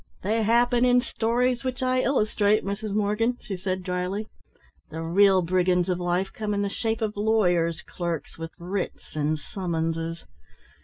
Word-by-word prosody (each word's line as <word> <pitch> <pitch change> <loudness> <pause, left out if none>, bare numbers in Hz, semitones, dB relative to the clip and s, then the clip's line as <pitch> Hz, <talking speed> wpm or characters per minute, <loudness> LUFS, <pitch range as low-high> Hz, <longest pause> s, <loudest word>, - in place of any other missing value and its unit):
"They 220 +4 +1
happen 240 +2 +3
in 250 0 +5
stories 240 +1 0
which 255 -1 -3
I 255 0 +2
illustrate, 215 -5 +2
Mrs. 200 +1 -3
Morgan," 215 +4 +1
she 200 - -5
said 185 0 -3
dryly. 180 +3 -2 0.6
"The 160 +1 -5
real 190 +2 +4
brigands 180 +1 +2
of 180 -1 0
life 180 +2 -1
come 210 -1 -2
in 200 - 0
the 200 - -1
shape 225 +2 -2
of 215 -1 -2
lawyers' 180 -6 +2
clerks 170 -3 -4
with 165 0 -6
writs 180 0 -5
and 155 +1 0
summonses. 165 -1 -3
200 Hz, 155 wpm, -26 LUFS, 175-220 Hz, 0.6 s, in